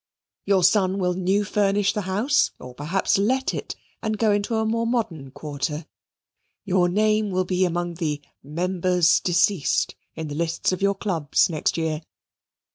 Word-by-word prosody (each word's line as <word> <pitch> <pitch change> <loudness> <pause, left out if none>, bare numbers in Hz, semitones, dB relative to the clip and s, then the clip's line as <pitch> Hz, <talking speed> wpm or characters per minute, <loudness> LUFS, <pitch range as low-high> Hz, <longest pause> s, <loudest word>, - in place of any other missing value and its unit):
Your 195 -2 +3
son 190 +1 +3
will 180 -2 +1
new 190 +3 +1
furnish 200 0 +1
the 210 - -1
house, 255 +9 +2
or 125 0 -10
perhaps 170 +9 0
let 260 +6 +1
it, - - -5 0.3
and 220 -1 -2
go 220 0 +3
into 205 +2 0
a 220 0 +1
more 230 +1 0
modern 180 - -2
quarter; 150 +2 -4 0.8
your 180 -2 +2
name 215 +2 +2
will 185 -1 0
be 185 +1 +1
among 175 0 -2
the 155 -4 -2 0.2
"Members 180 +2 +2
Deceased" 170 - +1 0.2
in 160 - -5
the 145 - -6
lists 165 +3 -1
of 185 - -3
your 200 0 +2
clubs 170 -5 +1
next 155 +1 -1
year. 160 -1 -1
185 Hz, 160 wpm, -24 LUFS, 165-205 Hz, 0.8 s, Your